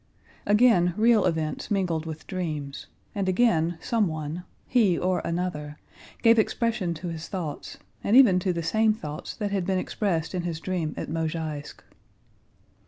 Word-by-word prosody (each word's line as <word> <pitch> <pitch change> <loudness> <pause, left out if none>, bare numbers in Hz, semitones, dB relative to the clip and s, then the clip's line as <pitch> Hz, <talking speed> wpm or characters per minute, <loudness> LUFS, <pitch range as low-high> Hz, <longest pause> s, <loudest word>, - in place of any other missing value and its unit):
Again 205 -5 +4
real 225 -1 +4
events 155 -2 -2
mingled 175 -6 0
with 160 -1 -7
dreams 155 -7 -4 0.3
and 195 -2 -1
again 175 -5 +2
someone, 165 -7 -1 0.2
he 215 -8 +3
or 185 0 +1
another, 165 -4 -3 0.5
gave 230 -1 +6
expression 220 -5 0
to 170 +3 -5
his 165 -1 -6
thoughts, 170 -7 -5 0.3
and 215 +5 +4
even 210 -9 +7
to 185 0 0
the 170 -1 -3
same 220 +5 +2
thoughts 150 -7 -7
that 205 -3 -3
had 195 -2 0
been 190 +1 0
expressed 180 -4 -1
in 180 - -1
his 170 -2 -3
dream 170 -3 -2
at - - -4
Mozháysk. 160 -2 -4
175 Hz, 150 wpm, -26 LUFS, 160-205 Hz, 0.5 s, even